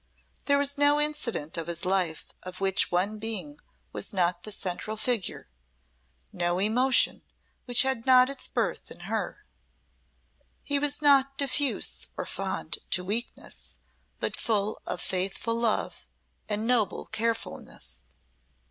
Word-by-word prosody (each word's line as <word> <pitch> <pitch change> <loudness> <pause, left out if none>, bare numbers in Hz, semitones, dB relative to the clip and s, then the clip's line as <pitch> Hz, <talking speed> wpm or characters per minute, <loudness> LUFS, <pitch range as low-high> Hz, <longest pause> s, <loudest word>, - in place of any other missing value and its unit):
There 280 0 +4
was 280 0 +1
no 290 +1 +5
incident 260 - 0
of 165 - -5
his 170 0 -3
life 180 -4 +1 0.2
of 185 0 -9
which 195 -1 +3
one 200 +5 0
being 225 +7 -3 0.3
was - - -2
not 175 -2 +1
the 215 - -6
central 205 +2 -3
figure, 225 -4 -1 0.9
no 175 0 0
emotion 245 +7 +3 0.4
which 245 0 +4
had 265 -2 -1
not 255 -1 +7
its 275 0 -4
birth - - -2
in - - -9
her. - - -4 1.2
He 285 -1 +1
was 290 +1 +1
not 275 -1 +5
diffuse 280 0 +1
or - - -3
fond - - -3
to 180 - +1
weakness, 215 +6 -4 0.4
but - - -1
full 215 -2 -1
of 180 - -3
faithful 195 +4 0
love 230 -1 -1 0.4
and 210 +1 0
noble 235 -4 +2
carefulness. 220 - -4
220 Hz, 130 wpm, -28 LUFS, 185-265 Hz, 1.2 s, not